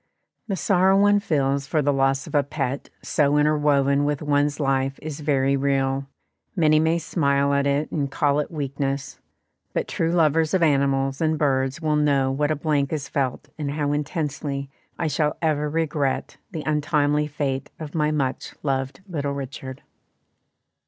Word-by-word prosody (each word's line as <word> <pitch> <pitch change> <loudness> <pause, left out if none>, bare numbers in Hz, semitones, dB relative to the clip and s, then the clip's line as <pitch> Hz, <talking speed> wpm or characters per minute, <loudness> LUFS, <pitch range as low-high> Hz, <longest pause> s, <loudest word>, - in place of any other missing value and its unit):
The 200 - -1
sorrow 190 +1 +3
one 205 0 +5
feels 140 -6 0
for 155 -1 +1
the 145 +1 +2
loss 135 0 +1
of - - -11
a 145 - +4
pet 140 -1 -3
so 145 -1 +2
interwoven 145 -2 +3
with 145 0 -1
one's 145 0 +1
life 135 -1 0
is 155 -1 -6
very 140 -2 +1
real; 135 0 0 0.5
many 155 -4 +4
may 160 +2 +2
smile 140 -4 +1
at 140 0 +2
it 140 +2 0
and 140 -3 -1
call 140 +1 +1
it 150 - -2
weakness, 140 -2 -3 0.5
but - - -1
true 165 0 -1
lovers 160 -1 +3
of 180 - +2
animals 135 -2 +1
and 160 -1 +2
birds 135 +1 0
will 155 -1 +2
know 140 -3 +2
what 145 +2 0
a 155 - +1
blank 145 -2 0
is 145 -3 -3
felt 140 0 -2
and 145 -2 -2
how 145 -1 -1
intensely 145 -2 -3 0.3
I 165 - -2
shall 150 0 0
ever 150 -2 0
regret 150 -3 -1
the 160 -4 -5
untimely 150 -1 +1
fate 135 -3 -3
of 155 -2 -7
my 150 -2 +1
much 140 -4 -2
loved 135 +1 -2
little 145 -6 -2
Richard. 135 -1 -7
145 Hz, 165 wpm, -24 LUFS, 140-155 Hz, 0.5 s, one